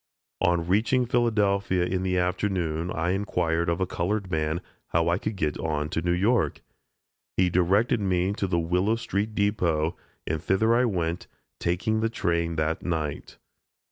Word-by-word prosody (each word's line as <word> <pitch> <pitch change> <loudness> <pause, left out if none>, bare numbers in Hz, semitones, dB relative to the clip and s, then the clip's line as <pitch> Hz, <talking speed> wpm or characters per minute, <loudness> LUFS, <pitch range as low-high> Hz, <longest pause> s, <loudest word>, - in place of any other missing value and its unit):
On 85 -1 +2
reaching 115 +7 +2
Philadelphia 105 -6 +1
in 95 +1 -1
the 95 -1 0
afternoon 90 -2 -1
I 85 +1 -1
inquired 85 -4 0
of 85 +1 0
a 95 - +2
colored 95 +2 -2
man 80 0 0 0.3
how 85 0 +1
I 85 +2 +1
could 110 0 -3
get 75 -5 -1
on 75 -2 -1
to 80 - -1
New 85 +1 0
York? 100 +6 +1 0.8
He 90 -1 +3
directed 95 +7 +3
me 95 -1 +1
to 100 - -2
the 90 -2 0
Willow 90 +6 +1
street 105 -1 -2
depot, 90 -6 +1 0.3
and 80 -1 -2
thither 105 +6 +2
I 125 +2 +4
went, 85 -5 -2 0.3
taking 95 +6 0
the 115 +1 +1
train 85 -6 -1
that 80 +1 -1
night. 80 -4 -3
90 Hz, 160 wpm, -26 LUFS, 85-100 Hz, 0.8 s, I